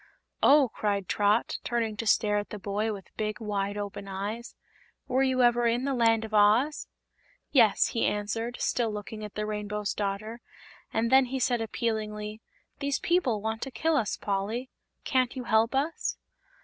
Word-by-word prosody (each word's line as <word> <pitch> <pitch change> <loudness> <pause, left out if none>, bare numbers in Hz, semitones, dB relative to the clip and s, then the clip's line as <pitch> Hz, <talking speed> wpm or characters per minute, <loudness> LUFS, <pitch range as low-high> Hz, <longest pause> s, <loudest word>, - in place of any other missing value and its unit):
"Oh!" 280 -3 +6
cried 200 -2 -1
Trot, 210 +2 +1
turning 230 -3 -1
to 225 - -3
stare 210 -1 +3
at 205 - -6
the 210 - -6
boy 205 +2 -2
with 195 -3 -9
big, 215 +1 -2
wide 205 -2 -2
open 200 -1 -5
eyes; 205 +5 -5 0.5
"were 260 +1 +1
you 260 -1 +3
ever 240 0 +4
in 240 +3 +1
the 275 - 0
Land 225 -2 +3
of 220 - -10
Oz?" 215 +8 +3 0.6
"Yes," 225 -7 +5
he 230 - +1
answered, 225 +4 -2
still 235 -3 0
looking 210 +1 -6
at 210 - -8
the 210 - -2
Rainbow's 210 -1 -3
Daughter; 215 +3 -3 0.5
and 230 +2 0
then 265 0 +6
he 260 +2 -3
said 245 -1 +1
appealingly: 215 -1 -3 0.4
"These 280 -1 0
people 260 - +1
want 220 0 -2
to 270 - -3
kill 320 +4 0
us, 225 -8 0
Polly. 210 +6 -2 0.3
Can't 255 -1 +1
you 255 - -4
help 230 +1 +2
us?" 295 +5 -1
220 Hz, 170 wpm, -28 LUFS, 210-245 Hz, 0.6 s, Oh